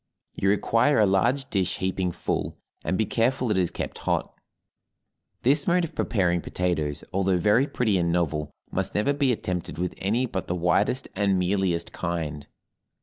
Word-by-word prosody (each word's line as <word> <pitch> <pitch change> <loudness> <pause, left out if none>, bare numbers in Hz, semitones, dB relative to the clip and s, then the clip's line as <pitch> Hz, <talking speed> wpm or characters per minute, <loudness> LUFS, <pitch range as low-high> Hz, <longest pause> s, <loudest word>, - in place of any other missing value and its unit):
You 95 - 0
require 115 +7 +3
a 105 - +5
large 120 +8 +2
dish 95 -3 0
heaping 95 -1 -1
full, - - -3 0.3
and 95 - 0
be 110 - +2
careful 120 +2 +1
it 100 - +1
is 90 -2 +1
kept - - -5
hot. - - -1 1.1
This 140 +3 +3
mode 175 0 +3
of 160 - -10
preparing 90 -5 +1
potatoes, 80 -6 -2
although 95 -1 +2
very 105 +10 +3
pretty 110 -9 +1
and 85 -1 +1
novel, 75 -3 0 0.2
must - - -2
never 105 +8 +2
be 140 -2 +2
attempted 90 -8 -3
with 90 +1 -2
any 115 +7 +1
but 95 -6 -4
the 90 - -1
whitest 90 +9 +1
and 100 -1 +2
mealiest 90 -2 0
kind. 80 -4 -3
95 Hz, 165 wpm, -26 LUFS, 90-115 Hz, 1.1 s, a